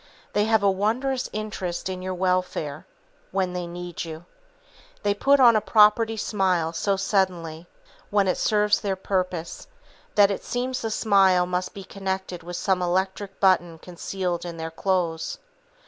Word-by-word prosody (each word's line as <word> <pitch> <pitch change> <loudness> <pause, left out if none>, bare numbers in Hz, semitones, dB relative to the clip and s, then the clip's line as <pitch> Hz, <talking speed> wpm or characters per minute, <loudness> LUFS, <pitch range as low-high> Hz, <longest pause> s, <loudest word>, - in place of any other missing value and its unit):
They 210 - +2
have 220 -2 +2
a 200 - +5
wondrous 245 +7 -1
interest 210 -5 -4
in 185 -1 -4
your 185 0 -3
welfare, 180 -5 -1 0.4
when 185 -1 -1
they 180 -1 -3
need 175 0 -6
you. 165 0 -8 0.8
They 205 -1 +2
put 275 +7 +3
on 240 -3 +7
a 215 - +3
"property" 220 +1 +4
smile 185 -6 0
so 200 +4 0
suddenly, 180 -4 -1 0.4
when 200 -1 +2
it 185 - 0
serves 210 -1 +2
their 195 -2 -1
purpose, 185 -3 -3 0.5
that 205 -1 +6
it 200 - -4
seems 250 +1 -2
the 225 - -2
smile 195 -5 +4
must 180 +1 -3
be 195 - -7
connected 190 -2 -4
with 175 +2 -7
some 185 0 0
electric 190 +2 -1
button 175 -4 +3
concealed 180 +1 -4
in 170 -1 -6
their 160 0 -5
clothes. 170 -2 -1
190 Hz, 155 wpm, -25 LUFS, 175-205 Hz, 0.8 s, on